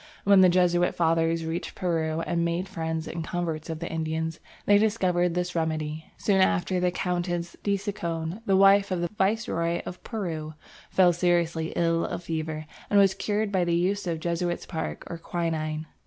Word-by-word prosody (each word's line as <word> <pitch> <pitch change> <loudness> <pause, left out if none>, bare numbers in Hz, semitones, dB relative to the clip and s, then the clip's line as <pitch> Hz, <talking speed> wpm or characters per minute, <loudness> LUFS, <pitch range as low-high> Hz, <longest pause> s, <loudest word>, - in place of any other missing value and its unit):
When 200 -1 +6
the 185 - +7
Jesuit 175 0 +3
fathers 165 0 +1
reached 165 +2 -4
Peru 165 -3 -1
and 170 0 -1
made 170 +2 -1
friends 160 -3 -3
and 165 0 -4
converts 165 -2 -3
of 160 - -3
the 170 +1 -5
Indians, 160 0 -2 0.3
they 205 0 +6
discovered 180 -5 +1
this 180 0 -1
remedy. 160 -1 -2
Soon 195 -2 +2
after 190 -1 +2
the 180 0 +2
Countess 175 -1 -2
de 200 -1 +1
Chinchon, 170 -2 -4
wife 195 +1 +5
of 185 -2 -1
the 175 - -1
Viceroy 190 -5 0
of 180 - -8
Peru, 160 -8 -4 0.3
fell 180 -2 +4
seriously 170 -2 +1
ill 165 -1 +2
of 175 -2 -4
fever 155 -1 -3 0.2
and 205 - +5
was 195 -1 +5
cured 210 +1 -1
by 190 -3 +2
the 170 -1 +1
use 190 +3 0
of 165 -2 -1
Jesuit's 175 +1 -2
bark 160 -3 -4
or 170 - -6
quinine. 160 -2 -2
175 Hz, 170 wpm, -27 LUFS, 160-185 Hz, 0.3 s, the